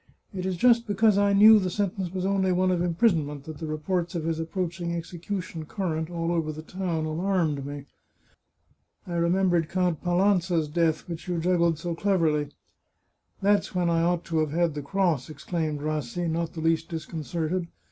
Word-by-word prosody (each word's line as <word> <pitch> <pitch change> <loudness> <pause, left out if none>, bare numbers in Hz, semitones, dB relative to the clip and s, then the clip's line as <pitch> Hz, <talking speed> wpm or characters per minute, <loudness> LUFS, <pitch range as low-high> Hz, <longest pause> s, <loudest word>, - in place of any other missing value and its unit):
" - - -41
It 185 -1 -3
is 185 -2 -2
just 235 +3 +4
because 210 0 +3
I 200 0 +3
knew 215 +2 +8
the 185 -2 -1
sentence 190 -1 -2
was 185 0 -3
only 190 -1 +2
one 185 +1 +2
of 175 -2 +1
imprisonment 165 -6 +1
that 155 0 -9
the 160 - -4
reports 170 +3 -2
of 165 - -2
his 165 0 -1
approaching 170 0 -3
execution 170 0 -5
current 160 -5 -2
all 170 -1 -2
over 165 -3 0
the 155 +1 -8
town 170 -3 -3
alarmed 160 -3 0
me. 145 -1 -7 1.2
I 175 - -6
remembered 170 -1 +2
Count 180 -4 0
Palanza's 175 -2 +2
death, 160 -1 0
which 170 -1 -7
you 175 -1 -1
juggled 170 -1 +2
so 170 +2 -3
cleverly." 165 -6 +1 0.5
" - - -43
That's 200 -1 +2
when 175 -1 +2
I 165 0 +2
ought 175 0 +1
to 165 -1 0
have 155 -1 +1
had 170 +1 +1
the 145 - -4
cross," 165 -3 0
exclaimed 155 0 -3
Rassi, 155 +2 -2
not 165 0 -2
the 160 - -5
least 165 0 +1
disconcerted. 165 +2 -3
170 Hz, 180 wpm, -26 LUFS, 160-185 Hz, 1.2 s, knew